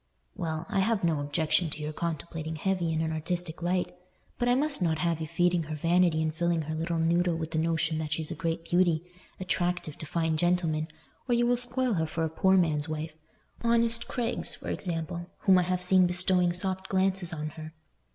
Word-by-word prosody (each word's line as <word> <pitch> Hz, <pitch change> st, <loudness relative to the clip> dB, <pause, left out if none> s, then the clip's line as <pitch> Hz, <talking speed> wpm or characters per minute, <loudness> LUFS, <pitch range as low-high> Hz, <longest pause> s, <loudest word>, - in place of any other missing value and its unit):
"Well, 160 Hz, -2 st, -3 dB
I 200 Hz, -, 0 dB
have 205 Hz, +1 st, +1 dB
no 165 Hz, -3 st, +2 dB
objection 155 Hz, +3 st, +1 dB
to 150 Hz, -, -6 dB
your 150 Hz, 0 st, -4 dB
contemplating 160 Hz, 0 st, -4 dB
Hetty 175 Hz, 0 st, 0 dB
in 160 Hz, 0 st, 0 dB
an 160 Hz, 0 st, -1 dB
artistic 170 Hz, +1 st, -3 dB
light, 180 Hz, +1 st, -1 dB, 0.4 s
but 245 Hz, -1 st, +1 dB
I 245 Hz, -, +4 dB
must 285 Hz, -3 st, +1 dB
not 160 Hz, -3 st, +1 dB
have 165 Hz, -1 st, 0 dB
you 160 Hz, -, -3 dB
feeding 175 Hz, +1 st, +2 dB
her 155 Hz, 0 st, -5 dB
vanity 165 Hz, 0 st, +2 dB
and 155 Hz, 0 st, -1 dB
filling 170 Hz, 0 st, 0 dB
her 155 Hz, +1 st, -4 dB
little 165 Hz, +2 st, -2 dB
noddle 170 Hz, +1 st, +2 dB
with 160 Hz, 0 st, -4 dB
the 160 Hz, -, 0 dB
notion 160 Hz, -1 st, 0 dB
that 155 Hz, -1 st, -4 dB
she's 155 Hz, +1 st, -1 dB
a -, -, -3 dB
great 165 Hz, 0 st, -2 dB
beauty, 175 Hz, -2 st, +2 dB, 0.4 s
attractive 175 Hz, -4 st, -2 dB
to 155 Hz, -, -6 dB
fine 160 Hz, 0 st, 0 dB
gentlemen, 165 Hz, -2 st, +1 dB, 0.4 s
or 240 Hz, -, +4 dB
you 240 Hz, 0 st, +3 dB
will 245 Hz, +1 st, +3 dB
spoil 250 Hz, 0 st, 0 dB
her 160 Hz, -4 st, 0 dB
for 165 Hz, +1 st, -2 dB
a 160 Hz, -, 0 dB
poor 190 Hz, +4 st, +3 dB
man's 155 Hz, -3 st, +1 dB
wife—honest 215 Hz, +9 st, -1 dB
Craig's, 240 Hz, -1 st, -1 dB
for -, -, -7 dB
example, 175 Hz, -1 st, -4 dB
whom 190 Hz, -2 st, +5 dB
I -, -, +2 dB
have 180 Hz, 0 st, 0 dB
seen 185 Hz, 0 st, +5 dB
bestowing 180 Hz, 0 st, +2 dB
soft 190 Hz, +2 st, -1 dB
glances 190 Hz, -2 st, +2 dB
on 155 Hz, -2 st, -4 dB
her. 155 Hz, +1 st, -10 dB
170 Hz, 200 wpm, -28 LUFS, 160-185 Hz, 0.4 s, whom